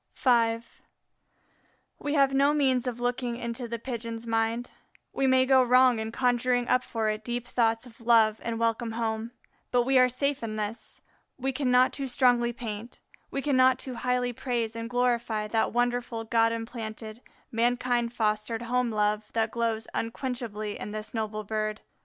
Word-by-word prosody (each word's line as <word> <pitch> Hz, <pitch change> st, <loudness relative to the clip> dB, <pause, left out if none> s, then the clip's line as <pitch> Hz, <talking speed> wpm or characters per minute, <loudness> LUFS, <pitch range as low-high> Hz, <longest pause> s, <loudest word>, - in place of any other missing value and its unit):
V 230 Hz, -3 st, +3 dB, 1.4 s
We 290 Hz, +1 st, -2 dB
have 275 Hz, -1 st, +4 dB
no 280 Hz, +2 st, +3 dB
means 260 Hz, -4 st, +2 dB
of 245 Hz, -1 st, -3 dB
looking 245 Hz, 0 st, -1 dB
into 235 Hz, +1 st, -5 dB
the 235 Hz, 0 st, -4 dB
Pigeon's 230 Hz, -1 st, -5 dB
mind; 225 Hz, +1 st, -1 dB, 0.4 s
we 270 Hz, -, +1 dB
may 260 Hz, 0 st, +4 dB
go 260 Hz, 0 st, +5 dB
wrong 250 Hz, -1 st, +5 dB
in 220 Hz, 0 st, -4 dB
conjuring 245 Hz, 0 st, +1 dB
up 255 Hz, -, +3 dB
for 220 Hz, -2 st, -1 dB
it 215 Hz, 0 st, -5 dB
deep 240 Hz, +1 st, -3 dB
thoughts 230 Hz, -1 st, +1 dB
of 235 Hz, -1 st, -16 dB
love 225 Hz, -2 st, +4 dB
and 230 Hz, 0 st, -3 dB
welcome 230 Hz, 0 st, 0 dB
home; 225 Hz, 0 st, -2 dB, 0.4 s
but 245 Hz, -1 st, +3 dB
we 265 Hz, +1 st, +4 dB
are 255 Hz, 0 st, +5 dB
safe 280 Hz, +3 st, -1 dB
in 220 Hz, -2 st, -4 dB
this, 215 Hz, +2 st, -5 dB, 0.4 s
we 265 Hz, +1 st, -1 dB
cannot 255 Hz, -1 st, +3 dB
too 275 Hz, -1 st, -3 dB
strongly 245 Hz, -2 st, +3 dB
paint, 230 Hz, -1 st, -7 dB, 0.3 s
we 275 Hz, -, -3 dB
cannot 260 Hz, -3 st, +4 dB
too 260 Hz, 0 st, -5 dB
highly 250 Hz, 0 st, -1 dB
praise 235 Hz, -2 st, -2 dB
and 230 Hz, 0 st, -5 dB
glorify 235 Hz, -3 st, 0 dB
that 220 Hz, +1 st, +1 dB
wonderful 245 Hz, -1 st, -1 dB
God 230 Hz, 0 st, +2 dB
implanted, 225 Hz, -1 st, -6 dB, 0.3 s
mankind 240 Hz, 0 st, +1 dB
fostered 220 Hz, +1 st, -1 dB
home 250 Hz, +1 st, 0 dB
love 210 Hz, -1 st, 0 dB
that 225 Hz, -1 st, 0 dB
glows 230 Hz, -1 st, -1 dB
unquenchably 230 Hz, -3 st, -4 dB
in -, -, -5 dB
this 215 Hz, 0 st, -5 dB
noble 215 Hz, -1 st, -3 dB
bird. 215 Hz, 0 st, -3 dB
235 Hz, 165 wpm, -28 LUFS, 225-250 Hz, 1.4 s, go